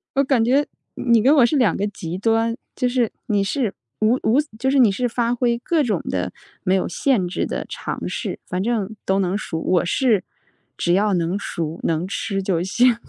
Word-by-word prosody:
我 275 Hz, -, +4 dB
感 260 Hz, -4 st, +2 dB
觉 275 Hz, +5 st, +3 dB, 0.3 s
你 235 Hz, -3 st, +3 dB
跟 270 Hz, +7 st, +5 dB
我 265 Hz, -5 st, +6 dB
是 290 Hz, +5 st, +1 dB
两 245 Hz, -6 st, +3 dB
个 200 Hz, -, -1 dB
极 175 Hz, -3 st, -6 dB
端， 225 Hz, +3 st, +1 dB, 0.2 s
就 250 Hz, -, 0 dB
是 245 Hz, -3 st, +1 dB
你 205 Hz, -4 st, +1 dB
是 225 Hz, 0 st, -1 dB, 0.3 s
无 215 Hz, +3 st, +3 dB
无 235 Hz, +6 st, +3 dB, 0.2 s
就 265 Hz, +4 st, 0 dB
是 275 Hz, -, +3 dB
你 240 Hz, -4 st, +7 dB
是 245 Hz, +6 st, -1 dB
发 235 Hz, 0 st, 0 dB
挥 240 Hz, -1 st, +1 dB
各 310 Hz, +6 st, +1 dB
种 210 Hz, -9 st, 0 dB
的 90 Hz, -1 st, -2 dB, 0.3 s
没 185 Hz, -, +2 dB
有 190 Hz, -, 0 dB
限 210 Hz, -1 st, +1 dB
制 175 Hz, -, -2 dB
的 -, -, -4 dB
尝 -, -, -5 dB
试， -, -, -4 dB
反 180 Hz, +1 st, -2 dB
正 220 Hz, -2 st, -1 dB
都 190 Hz, +1 st, +2 dB
能 190 Hz, +1 st, 0 dB
熟。 165 Hz, -6 st, -4 dB
我 180 Hz, +1 st, +2 dB
是 215 Hz, 0 st, +2 dB, 0.5 s
只 175 Hz, -, +1 dB
要 205 Hz, +2 st, +3 dB
能 175 Hz, +2 st, 0 dB
熟 165 Hz, -5 st, -4 dB
能 165 Hz, +2 st, 0 dB
吃 195 Hz, 0 st, -2 dB
就 185 Hz, -3 st, 0 dB
行， 240 Hz, +6 st, +3 dB
220 Hz, 220 characters per minute, -21 LUFS, 185-245 Hz, 0.5 s, 你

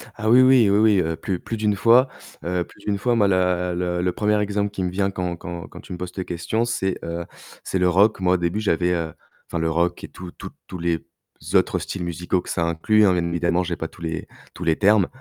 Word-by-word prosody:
Ah 110 Hz, +1 st, -2 dB
oui, 125 Hz, +2 st, +7 dB
oui, 130 Hz, -5 st, +6 dB
oui, 100 Hz, -, +4 dB
oui, 105 Hz, -3 st, +5 dB
heu, 80 Hz, 0 st, -1 dB
plus 90 Hz, 0 st, -3 dB
plus 115 Hz, -, -5 dB
d'1 105 Hz, -1 st, +1 dB
fois, 120 Hz, +6 st, +5 dB, 0.4 s
heu, 90 Hz, 0 st, -1 dB
plus -, -, -19 dB
d'1 100 Hz, -1 st, 0 dB
fois, 120 Hz, +4 st, +1 dB
moi, 105 Hz, -3 st, +4 dB
la 90 Hz, -1 st, +1 dB
le 90 Hz, 0 st, -1 dB
le 90 Hz, 0 st, +1 dB
1er 105 Hz, +2 st, +1 dB
exemple 105 Hz, 0 st, -1 dB
qui 95 Hz, -2 st, -3 dB
me 90 Hz, -, 0 dB
vient 95 Hz, +1 st, 0 dB
quand 90 Hz, -2 st, -3 dB
quand 85 Hz, 0 st, -7 dB
quand -, -, -12 dB
tu -, -, -14 dB
me -, -, -5 dB
poses 90 Hz, 0 st, -5 dB
cette 95 Hz, -, -4 dB
question 100 Hz, +7 st, -1 dB
c'est, 95 Hz, -6 st, -1 dB
heu, 85 Hz, 0 st, -4 dB, 0.4 s
c'est 95 Hz, -, -2 dB
le 90 Hz, 0 st, +3 dB
rock. 100 Hz, +4 st, +3 dB
Moi, 90 Hz, -1 st, +2 dB
au -, -, +2 dB
début, 85 Hz, +4 st, -1 dB
j'avais, 90 Hz, -3 st, +1 dB
heu, 80 Hz, -2 st, -2 dB, 0.3 s
enfin, 85 Hz, -, -3 dB
le 80 Hz, 0 st, 0 dB
rock 85 Hz, +2 st, 0 dB
et -, -, -5 dB
tous 90 Hz, -1 st, -10 dB
tous -, -, -9 dB, 0.2 s
tous 90 Hz, -, -7 dB
les 85 Hz, -1 st, -1 dB, 0.5 s
autres -, -, +3 dB
styles 95 Hz, -3 st, -5 dB
musicaux 90 Hz, +1 st, -1 dB
que -, -, -11 dB
ça 85 Hz, -, 0 dB
inclut, 95 Hz, +6 st, +3 dB
hein, 95 Hz, -, +4 dB
bien 85 Hz, -1 st, 0 dB
évidemment, 85 Hz, +1 st, +1 dB
j'ai 85 Hz, -1 st, -3 dB
pas 80 Hz, -, -4 dB
tous 85 Hz, -, -18 dB
les 80 Hz, -1 st, -4 dB, 0.3 s
tous -, -, -7 dB
les 80 Hz, -1 st, +2 dB
termes, 105 Hz, -2 st, +4 dB
90 Hz, 255 wpm, -23 LUFS, 85-105 Hz, 0.5 s, oui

